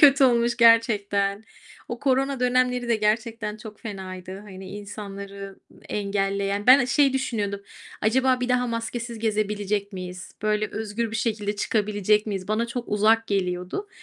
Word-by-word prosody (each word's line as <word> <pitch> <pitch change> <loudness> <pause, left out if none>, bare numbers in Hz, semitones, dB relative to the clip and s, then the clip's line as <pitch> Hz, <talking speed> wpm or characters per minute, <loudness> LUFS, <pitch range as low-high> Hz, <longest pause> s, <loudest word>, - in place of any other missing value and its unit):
Kötü 275 -1 +7
olmuş 235 -1 +3
gerçekten. 210 -3 +3 0.4
O 240 - -4
korona 270 0 +1
dönemleri 250 -1 +1
de 230 - +3
gerçekten 215 0 -1
çok 215 -1 -11
fenaydı, 190 -3 -7
hani, 190 -2 -10
insanları 200 -1 -8 0.3
engelleyen. 200 0 -1
Ben, 255 +2 +9
eee, 245 - +1
şey 275 +2 +3
düşünüyordum: 215 -7 -2 0.4
"Acaba 255 +3 +2
bir 250 - -1
daha 250 0 +2
maskesiz 235 0 -4
gezebilecek 210 -2 -1
miyiz? 185 0 -7
Böyle 215 0 0
özgür 220 +1 -3
bir 220 - -2
şekilde 210 -2 -1
çıkabilecek 210 0 +1
miyiz?" 195 -2 -4
Bana 220 +2 +1
çok 240 +1 -5
uzak 220 +2 +3
geliyordu. 185 - -2
215 Hz, 140 wpm, -25 LUFS, 200-235 Hz, 0.4 s, Ben